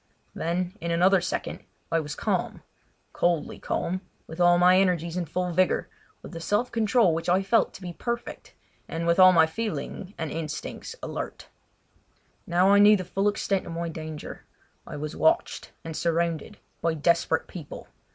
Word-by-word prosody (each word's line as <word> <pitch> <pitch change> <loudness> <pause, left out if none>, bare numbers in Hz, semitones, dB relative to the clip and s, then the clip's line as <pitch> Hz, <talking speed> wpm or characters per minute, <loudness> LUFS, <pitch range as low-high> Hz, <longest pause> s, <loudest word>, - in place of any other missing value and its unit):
Then, 180 +3 -2
in 170 - -3
another 180 +3 +4
second, 180 - -4 0.3
I 165 - +3
was 150 -2 -5
calm—coldly 175 -3 -3
calm, 185 +2 -2 0.2
with 160 +2 -6
all 175 0 +6
my 180 +1 +6
energies 175 -3 +1
in 180 -1 -1
full 180 +3 -2
vigour, 185 +2 +1 0.3
with - - -10
a - - -5
self 205 +8 0
control 220 -4 +3
which 165 +2 -2
I 185 +2 +3
felt 220 +3 +2
to 190 - -11
be 175 -1 -5
perfect 235 +5 -5 0.3
and 165 +1 -4
with 170 +2 +2
all 185 0 +9
my 165 -3 +6
feeling 205 +1 -5
and 160 -2 -4
instincts 155 -2 -5
alert. - - -6 1.0
Now 180 +3 +4
I 200 - +6
knew 210 +1 +7
the 185 - -5
full 195 +3 0
extent 200 -2 -1
of 170 - -6
my 170 0 -3
danger: 155 -1 -7 0.4
I - - -7
was 150 +1 -5
watched 330 +2 +1
and 160 -1 -6
surrounded 170 -2 -1 0.2
by 165 -1 +1
desperate 170 +2 +1
people! 165 -6 -9
175 Hz, 165 wpm, -26 LUFS, 165-190 Hz, 1.0 s, all